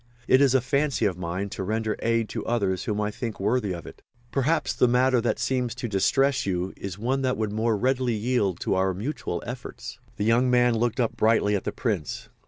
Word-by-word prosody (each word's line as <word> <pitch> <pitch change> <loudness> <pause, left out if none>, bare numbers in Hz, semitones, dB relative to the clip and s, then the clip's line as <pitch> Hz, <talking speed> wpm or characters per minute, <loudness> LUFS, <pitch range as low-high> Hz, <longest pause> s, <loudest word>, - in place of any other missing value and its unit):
It 130 - +5
is 135 -2 +4
a 130 - +4
fancy 140 -1 0
of 95 -3 +1
mine 90 +3 -3
to 100 - -6
render 110 +2 -1
aid 115 -1 +1
to - - -4
others 100 -6 0
whom 105 -1 -1
I 105 0 0
think 115 +1 -5
worthy 105 +1 0
of 85 -3 -6
it. - - -12 0.3
Perhaps 150 +3 +1
the 125 - +3
matter 125 0 +3
that 120 - 0
seems 120 0 -1
to 125 -1 -4
distress 130 +7 +2
you 90 -1 -2
is 95 -1 -6
one 130 +5 -1
that 130 -1 0
would 110 -2 -1
more 110 0 +1
readily 125 +1 +1
yield 105 -4 0
to - - 0
our 95 0 +1
mutual 105 - -4
efforts." 125 +1 -7 0.2
The 105 - -1
young 120 +3 +3
man 125 -1 +4
looked 115 +1 0
up 115 -3 0
brightly 110 -2 +3
at 100 - -3
the - - -1
Prince. 100 - -3
115 Hz, 215 wpm, -26 LUFS, 100-125 Hz, 0.3 s, It